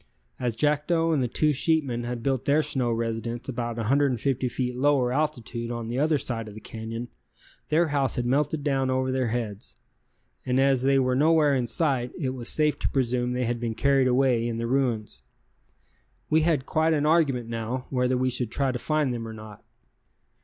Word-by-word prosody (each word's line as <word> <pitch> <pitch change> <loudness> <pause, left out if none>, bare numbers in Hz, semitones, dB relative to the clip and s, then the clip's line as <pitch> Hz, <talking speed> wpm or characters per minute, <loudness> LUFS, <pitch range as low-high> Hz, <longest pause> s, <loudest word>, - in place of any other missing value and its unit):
As 120 -3 -1
Jackdo 155 +4 +1
and 145 - +1
the 125 - +1
two 150 +5 +1
sheepmen 140 -5 0
had 120 -1 -4
built 135 -2 -1
their 150 +2 +3
snow 130 -4 -1
residence 115 +1 -3
about 120 -2 -3
150 130 +1 +1
feet 125 0 -3
lower 130 -2 +2
altitude 125 -5 -2
on 120 -1 -4
the 120 +2 -2
other 155 +1 +3
side 115 -4 -3
of 105 - -10
the - - -8
canyon, 115 +2 -6 0.6
their 160 +2 +2
house 140 -4 0
had 120 - -1
melted 145 +3 0
down 135 -2 0
over 130 0 0
their 130 -1 0
heads, 110 -2 -4 0.6
and 125 +1 0
as 135 -2 +3
they 135 +1 +3
were 130 -1 +2
nowhere 150 +1 +4
in 125 -3 0
sight 125 -1 0
it 135 -7 -2
was 125 -2 -2
safe 150 -1 +2
to - - -1
presume 125 -2 0
they 125 0 -1
had 120 0 -2
been 115 -2 -3
carried 135 0 +3
away 125 -2 +2
in 115 -1 -3
the 115 - -2
ruins. 120 - -1 1.1
We 160 +1 +4
had 155 -5 +1
quite 160 +1 +2
an 145 0 0
argument 145 -7 +2
now, 115 +2 -4
whether 125 -1 +1
we 130 0 +1
should 125 -2 -2
try 135 +2 0
to 125 - -4
find 155 -3 0
them 115 -1 -5
or 110 - -7
not. 110 -1 -11
130 Hz, 195 wpm, -26 LUFS, 120-145 Hz, 1.1 s, nowhere